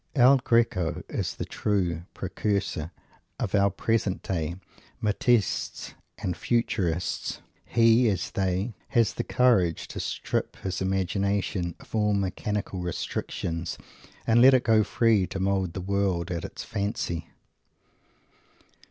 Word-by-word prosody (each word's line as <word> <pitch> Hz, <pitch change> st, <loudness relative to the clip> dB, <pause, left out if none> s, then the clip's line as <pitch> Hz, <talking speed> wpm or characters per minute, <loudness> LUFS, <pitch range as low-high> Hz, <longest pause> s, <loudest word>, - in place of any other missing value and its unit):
El 135 Hz, +1 st, +7 dB
Greco 115 Hz, -, +1 dB
is -, -, -2 dB
the -, -, -4 dB
true 90 Hz, -5 st, -1 dB
precursor 100 Hz, -6 st, -2 dB, 0.5 s
of -, -, -2 dB
our 100 Hz, -1 st, +4 dB
present 105 Hz, -1 st, -1 dB
day 85 Hz, -2 st, -2 dB, 0.4 s
Matissists 110 Hz, +1 st, 0 dB, 0.2 s
and 90 Hz, -, -2 dB
Futurists. 90 Hz, -7 st, -1 dB, 0.3 s
He, 115 Hz, +1 st, +4 dB
as 95 Hz, -4 st, -2 dB
they, 95 Hz, +4 st, -1 dB
has 115 Hz, -4 st, +2 dB
the -, -, -2 dB
courage 100 Hz, -10 st, +2 dB
to -, -, -6 dB
strip -, -, -2 dB
his 95 Hz, -1 st, -4 dB
imagination 95 Hz, -1 st, 0 dB
of -, -, -17 dB
all 105 Hz, -1 st, +2 dB
mechanical 100 Hz, 0 st, -2 dB
restrictions 85 Hz, -1 st, -3 dB, 0.5 s
and 115 Hz, +1 st, +5 dB
let 130 Hz, +1 st, +8 dB
it 125 Hz, -, +2 dB
go 110 Hz, -2 st, +4 dB
free 110 Hz, -3 st, +2 dB
to 95 Hz, -, -5 dB
mould 95 Hz, -2 st, 0 dB
the 95 Hz, -, -4 dB
world 95 Hz, -3 st, 0 dB
at 85 Hz, -1 st, -3 dB
its -, -, -7 dB
fancy. 100 Hz, -5 st, -3 dB
100 Hz, 125 wpm, -27 LUFS, 90-115 Hz, 0.5 s, let